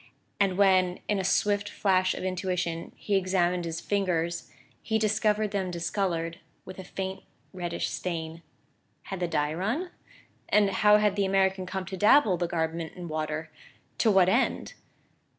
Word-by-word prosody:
And 195 -2 +2
when, 185 -2 +3
in 205 -2 +1
a - - -1
swift 205 +2 +1
flash 185 -2 +1
of - - -6
intuition, 180 -2 -2
he 205 - -2
examined 180 -2 +1
his 165 0 -4
fingers, 175 -4 -1 0.3
he 220 - 0
discovered 215 -1 +1
them 195 -2 -1
discoloured 170 -1 -2 0.3
with 185 0 -9
a - - -6
faint 190 +1 -5 0.3
reddish 175 -2 -3
stain. 165 -2 -4 0.6
Had 195 - -6
the 175 - 0
dye 150 -2 0
run? 235 - -2 0.6
And 205 -2 +4
how 210 +2 +5
had 210 -2 +2
the 200 -1 +1
American 190 -1 +1
come 190 0 -4
to 190 0 -6
dabble 210 -1 +5
the 175 0 -1
garment 165 -1 -2
in 175 -2 -7
water 155 0 -3 0.5
to 225 - +4
what 190 -3 +5
end? 235 +8 +1
185 Hz, 155 wpm, -28 LUFS, 170-200 Hz, 0.6 s, how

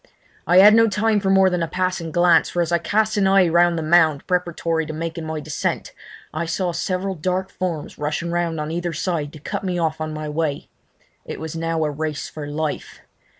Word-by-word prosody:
I 175 +2 +4
had 205 +3 +9
no 225 0 +6
time 210 +1 +1
for 195 -1 -1
more 190 -1 +5
than 180 -1 -1
a 165 - 0
passing 185 -1 -2
glance, 175 0 +4
for 175 - 0
as 170 - -4
I 170 - +3
cast 215 +3 0
an 195 -1 +3
eye 190 -2 +5
round 170 +1 +3
the 160 - -2
mound 160 -3 +3
preparatory 170 -2 -1
to 155 - -5
making 165 0 -5
my 160 0 -3
descent 150 0 -3 0.4
I 160 +2 -2
saw 175 +2 -1
several 185 +3 -2
dark 185 +3 -2
forms 175 -5 -4
rushing 150 +3 -2
round 170 -2 -1
on 150 +1 -3
either 175 0 -3
side 155 -3 -2
to 155 - -10
cut 200 +7 -5
me 180 -2 -2
off 160 -2 -1
on 155 0 -3
my 155 0 -5
way. 150 -1 -2 0.5
It - - -7
was 160 0 -6
now 165 0 -1
a 150 - -1
race 150 0 -4
for 150 -2 -7
life. 150 +1 -4
170 Hz, 215 wpm, -21 LUFS, 155-185 Hz, 0.5 s, had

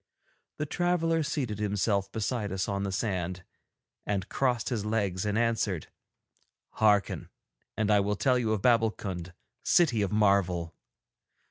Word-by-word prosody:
The 150 - -2
traveller 165 0 +1
seated 130 -8 -2
himself 100 -1 0
beside 110 -2 -2
us 95 -1 -1
on 100 0 -2
the 100 -1 -2
sand, 95 -3 -2 0.6
and 100 -2 -2
crossed 125 -3 0
his 115 -5 -2
legs 105 -3 -1
and 105 +1 0
answered: 115 -7 0 0.8
'Hearken, 105 -2 +2 0.5
and 110 -1 +1
I 105 - +5
will 100 +1 0
tell 125 +3 +2
you 115 -3 0
of 105 -3 -1
Babbulkund, 105 -7 +1 0.3
City 135 -11 +3
of 100 - 0
Marvel. 95 -5 +2
105 Hz, 135 wpm, -29 LUFS, 100-115 Hz, 0.8 s, I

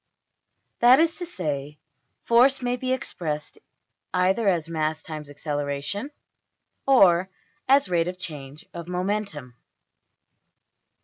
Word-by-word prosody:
That 245 +3 +7
is 330 0 +3
to 350 - -5
say, 150 - -4 0.5
force 255 +3 +4
may 245 0 0
be 255 +1 -3
expressed 155 -12 -4 0.6
either 190 +4 +2
as 170 -4 +1
mass 155 -1 -2
times 155 -3 -7
acceleration, 145 - -3 0.8
or 190 -9 +5 0.4
as 275 -4 +5
rate 170 -2 +1
of 180 0 -4
change 150 -4 -7
of 170 -1 -7
momentum. 180 - -3
180 Hz, 110 wpm, -25 LUFS, 150-235 Hz, 0.8 s, That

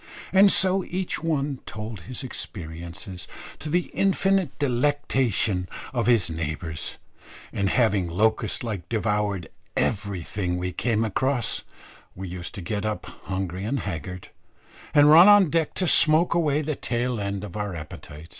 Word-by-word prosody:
and 195 +1 +7
so 190 0 +4
each 185 -2 -3
one 145 -4 -1
told 105 -1 -6
his 125 +8 -6
experiences, 85 -4 -7 0.3
to 155 - -5
the 175 +3 0
infinite 195 -6 +1
delectation 125 -8 0 0.2
of 120 -2 0
his 115 -6 +4
neighbours, 80 0 -4 0.6
and 100 -1 0
having 105 -7 +2
locust 110 +5 +1
like 105 -7 -5
devoured 105 -5 0 0.3
everything 95 -3 -1
we 90 0 -2
came 115 +2 0
across, 125 +3 0 0.5
we 95 +1 -6
used 90 0 -7
to 95 - -6
get 100 +3 -2
up 110 0 -3 0.2
hungry 95 -1 -3
and 130 +6 -1
haggard, 90 -1 -6 0.7
and 145 0 +7
run 170 +5 +9
on 205 -6 +7
deck 165 -2 0
to 185 - 0
smoke 160 +2 +5
away 155 -3 +1
the 155 +1 -1
tail 120 -1 -2
end 100 -1 -3
of 105 -3 -8
our 105 -3 -3
appetite. 75 0 -9
110 Hz, 145 wpm, -25 LUFS, 95-145 Hz, 0.7 s, run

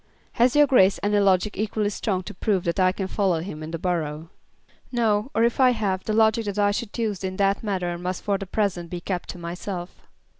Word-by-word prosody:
"Has 245 +3 +2
your 295 0 +7
Grace 200 -8 +4
any 205 0 +2
logic 195 +1 +2
equally 210 0 -1
strong 190 -2 -2
to - - -8
prove 190 0 0
that 170 +2 -1
I 185 0 +4
can 195 +1 -4
follow 190 -3 0
him 160 -2 -6
in 155 - -6
the 165 - -4
borough?" 160 -2 -3 0.6
"No; 225 -1 +1
or 225 - +3
if 235 +2 +1
I 255 -1 +6
have, 195 -5 -2
the 215 - -1
logic 220 +1 +3
that 205 0 -4
I 205 -1 +3
should 210 +1 -4
use 215 -5 -2
in 185 0 -3
that 195 0 +2
matter 185 -5 -2
must 180 +1 -4
for 200 -1 0
the 195 - -6
present 185 -4 -1
be 175 - -4
kept 180 0 -4
to - - -6
myself." 175 +1 -6
195 Hz, 225 wpm, -24 LUFS, 180-215 Hz, 0.6 s, your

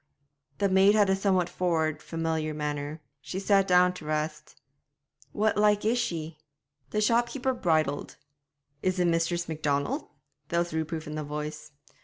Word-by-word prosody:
The 200 - +2
maid 195 +2 +5
had 205 -2 +4
a - - +4
somewhat 190 -3 +1
forward, 160 -4 0
familiar 160 -2 -2
manner; 150 +1 -4 0.2
she 180 - -6
sat 195 0 +3
down 180 0 +5
to 170 -4 -10
rest. 155 0 -3 0.7
'What 215 +1 +1
like 210 0 +3
is 235 +3 +2
she?' 165 -8 -3 0.5
The 210 - 0
shopkeeper 240 +4 +1
bridled. 155 - 0 0.7
'Is 185 0 0
it 180 - +2
Mistress 170 +1 +1
Macdonald?' 155 - -1 0.4
There 170 - 0
was 170 -1 -2
reproof 160 0 -3
in 150 - -6
the 155 0 -3
voice. 150 +1 -6
170 Hz, 150 wpm, -28 LUFS, 155-195 Hz, 0.7 s, maid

